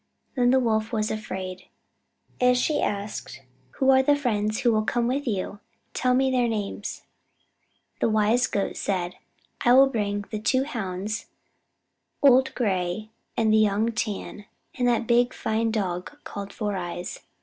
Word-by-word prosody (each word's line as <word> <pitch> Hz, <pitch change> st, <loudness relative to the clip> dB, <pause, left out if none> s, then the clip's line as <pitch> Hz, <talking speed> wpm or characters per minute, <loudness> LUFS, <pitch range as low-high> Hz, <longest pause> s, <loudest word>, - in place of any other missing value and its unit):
Then 245 Hz, -2 st, +3 dB
the 260 Hz, +1 st, +5 dB
Wolf 220 Hz, -3 st, 0 dB
was 215 Hz, -1 st, 0 dB
afraid, 185 Hz, -4 st, -5 dB, 0.7 s
and 250 Hz, 0 st, +4 dB
she 300 Hz, +5 st, +1 dB
asked: 205 Hz, +1 st, -4 dB, 0.3 s
"Who 270 Hz, -1 st, +4 dB
are 265 Hz, 0 st, +6 dB
the 290 Hz, +2 st, +4 dB
friends 215 Hz, -6 st, -1 dB
who 240 Hz, -3 st, +4 dB
will 215 Hz, -, +3 dB
come 235 Hz, +2 st, 0 dB
with 270 Hz, +3 st, -1 dB
you? 200 Hz, -1 st, -2 dB, 0.3 s
Tell 250 Hz, 0 st, +2 dB
me 265 Hz, +1 st, +2 dB
their 250 Hz, -2 st, +2 dB
names." 210 Hz, -2 st, -4 dB, 1.0 s
The -, -, +2 dB
wise 220 Hz, +4 st, +3 dB
Goat 200 Hz, -, -2 dB
said: 180 Hz, -2 st, -2 dB, 0.5 s
"I 240 Hz, -, +5 dB
will 265 Hz, +2 st, +8 dB
bring 205 Hz, -5 st, -2 dB
the 215 Hz, -, -2 dB
two 260 Hz, +5 st, +2 dB
Hounds, 210 Hz, -5 st, -4 dB, 1.0 s
Old 265 Hz, -1 st, +5 dB
Gray 195 Hz, -1 st, -1 dB, 0.3 s
and 220 Hz, -1 st, +3 dB
Young 215 Hz, +1 st, +3 dB
Tan, 210 Hz, -2 st, -4 dB, 0.3 s
and 250 Hz, -2 st, 0 dB
that 235 Hz, -1 st, +1 dB, 0.3 s
fine 220 Hz, +1 st, 0 dB
big -, -, 0 dB
dog 185 Hz, +4 st, -3 dB
called 200 Hz, -1 st, -7 dB
Four 210 Hz, -2 st, -3 dB
Eyes. 175 Hz, 0 st, -5 dB
220 Hz, 150 wpm, -25 LUFS, 205-250 Hz, 1.0 s, will